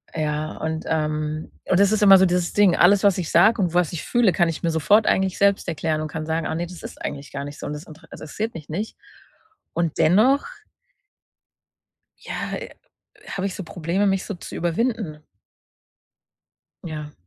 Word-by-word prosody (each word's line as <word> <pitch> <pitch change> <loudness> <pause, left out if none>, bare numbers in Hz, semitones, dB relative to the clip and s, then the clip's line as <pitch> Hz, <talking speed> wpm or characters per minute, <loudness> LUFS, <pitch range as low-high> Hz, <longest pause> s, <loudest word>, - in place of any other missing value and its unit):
Ja, 155 0 -2
und, 160 0 -3
ähm, 155 0 -2
das 195 +2 +3
ist 215 -1 +2
immer 195 -1 +9
so 190 - +5
dieses 180 -1 0
Ding, 205 -4 +4
alles, 195 +3 +5
was 200 -2 +4
ich 175 -4 -3
sage 225 0 +5
und 175 -3 0
was 175 -2 +1
ich 170 - -4
fühle, 240 -5 +3
kann 175 -1 +2
ich 160 - -5
mir 170 - +2
sofort 205 +7 +3
eigentlich 190 -1 +1
selbst 200 -1 +2
erklären 160 -1 -1
und 155 - -3
kann 155 +1 -5
sagen, 160 0 -2
ah, - - -2
ne, 170 +2 -3
das 180 -1 -11
ist - - -9
eigentlich 140 -1 -6
gar 140 0 -5
nicht 145 0 -9
so - - -7
und 145 - -4
das 150 +1 -7
intere 160 +1 -15
interessiert 210 +9 -5
mich 155 -3 -10
nicht 200 +8 -4 0.8
und 170 -2 -1
dennoch 230 - +4 1.7
ja, - - -5
äh, - - -7 0.6
habe 195 0 -3
ich 190 - -4
so 190 - -6
Probleme, 175 +4 -1
mich 195 -1 +1
so 210 - -5
zu 175 - -10
überwinden. 175 -1 -1 1.7
Ja. 150 -2 -6
170 Hz, 190 wpm, -23 LUFS, 155-195 Hz, 1.7 s, immer